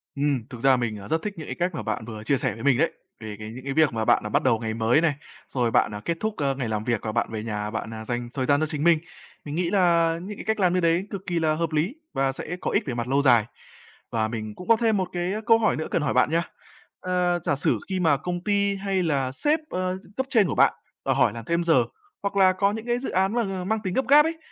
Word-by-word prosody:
Ừm, 140 -5 0
thực 120 -3 -9
ra 135 0 +5
mình, 115 -3 -2
à, 100 - -10
rất 160 0 0
thích 210 - -3
những 155 - -7
cái - - -4
cách 175 0 -1
mà - - -4
bạn 115 - -3
vừa 110 -2 -8
chia 135 +4 +2
sẻ - - -1
với 115 - -9
mình 140 -3 +4
đấy, - - +2 0.3
về 110 -1 -7
cái 110 0 -7
những 130 +2 -9
cái 135 - -2
việc 155 -5 +3
mà 110 -1 -1
bạn - - +3
là 105 - -4
bắt - - +1
đầu 115 -4 +3
ngày 110 -1 -3
mới 115 +7 +3
này, 160 -4 +2 0.4
rồi 120 -3 0
bạn, 105 - +2
à, 105 - -6
kết 170 -1 -1
thúc, 220 -1 -2
ơ, 140 -2 0
ngày 130 -4 -3
làm 105 -1 -2
việc 120 -2 0
và 110 - -2
bạn 115 0 -1
về 110 -1 -4
nhà 105 -2 -3
bạn, 110 0 -4
à, 110 0 -7
dành 120 +1 -3
thời 130 -2 -1
gian 145 +1 +3
cho 155 - +1
chính 150 -2 -3
mình, 170 -1 +5 0.5
mình 145 - -5
nghĩ 170 0 0
là 170 -4 +3
những 205 +1 -7
cái - - -8
cách 220 -1 0
làm 180 -2 +3
như 185 - +2
đấy 170 +3 +1
cực 200 - -5
kỳ 175 -2 0
là 155 -1 +2
hợp 165 0 -2
lý 160 - 0 0.2
và 135 0 +1
sẽ 160 +6 -5
có - - -1
ích 205 - +2
về 130 - -3
mặt 120 0 -3
lâu 140 +2 +2
dài. 120 -6 +5 0.7
Và 110 -1 0
mình 110 -2 -5
cũng 180 - -10
có 230 - +6
thêm 220 -2 +1
một 185 -1 -1
cái 175 +2 -1
câu 225 0 +6
hỏi 215 - +2
nữa 155 - -3
cần 165 - +1
hỏi 150 - 0
bạn 125 +3 +3
nha. 170 +1 +2 0.6
Ờ, 180 -1 +1
giả 145 - +2
sử 135 - +1
khi 190 -1 -1
mà 160 -5 +3
công 175 +4 -4
ty 200 -1 +1
hay 195 -2 -1
là 135 -5 0
sếp, 300 - +1
ơ, 185 0 -2 0.2
cấp 265 - 0
trên 220 -8 +4
của - - -2
bạn - - +5 0.3
và - - +2
hỏi - - +3
làm 115 -1 -8
thêm 170 +1 0
giờ 165 -1 +4 0.4
hoặc 200 0 -2
là 185 -1 +6
có 200 +2 +2
những 220 +2 -5
cái 240 0 0
dự 260 - -4
án 190 +2 +1
mà 195 -6 -1
mang 220 +3 0
tính 185 -3 -2
gấp 265 +1 0
gáp 295 +2 +7
ấy, 325 0 -2
160 Hz, 295 wpm, -25 LUFS, 120-190 Hz, 0.7 s, gáp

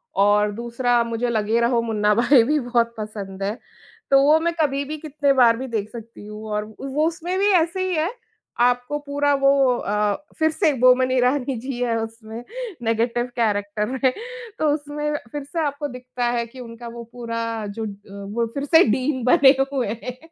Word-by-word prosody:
और 205 +1 +3
दूसरा 235 +2 0
मुझे 230 +1 -2
लगे 220 0 +1
रहो 235 0 +2
मुन्ना 210 -2 +1
भाई 245 +2 +5
भी 300 +5 +1
बहुत 240 -2 0
पसंद 200 -3 -6
है। 205 +4 -2 0.5
तो 275 0 +7
वो 305 +3 +5
मैं 340 +1 0
कभी 280 -2 +1
भी 305 +2 -5
कितने 290 -2 0
बार 240 -3 +5
भी 260 +2 -5
देख 215 -4 -3
सकती 230 -3 -10
हूँ 210 +1 -8
और 210 0 -1
व 215 0 -14 0.2
वो 305 +3 +2
उसमें 340 +2 -3
भी 405 +1 +3
ऐसे 345 +1 +2
ही 360 - 0
है, 315 +2 +1 0.5
आपको 245 +3 +2
पूरा 285 0 0
वो 275 -2 +4
अ, 210 -1 0 0.2
फिर 315 0 +4
से 310 -1 +2
बोमन 255 +1 +5
ईरानी 255 +1 +1
जी 255 +1 -5
है 230 -2 0
उसमें, 225 +1 -8 0.4
नेगेटिव 235 +1 0
कैरेक्टर 210 -2 0
में। 260 +2 +1 0.5
तो 310 - +2
उसमें 295 0 -3 0.2
फिर 290 -1 -5
से 290 +5 -5
आपको 290 +1 -3
दिखता 250 -1 -5
है 235 - -1
कि 235 +3 -14
उनका 235 -1 -9
वो 235 0 -8
पूरा 230 -2 -4
जो 205 +2 -5
ड 205 -2 -6
अ, 200 0 -8
वो 235 +1 +1
फिर 280 0 -3
से 320 +4 +6
डीन 260 +3 0
बने 265 +1 +6 0.2
हुए 260 -3 0 0.2
हैं। 250 0 -6
245 Hz, 190 wpm, -22 LUFS, 225-280 Hz, 0.5 s, तो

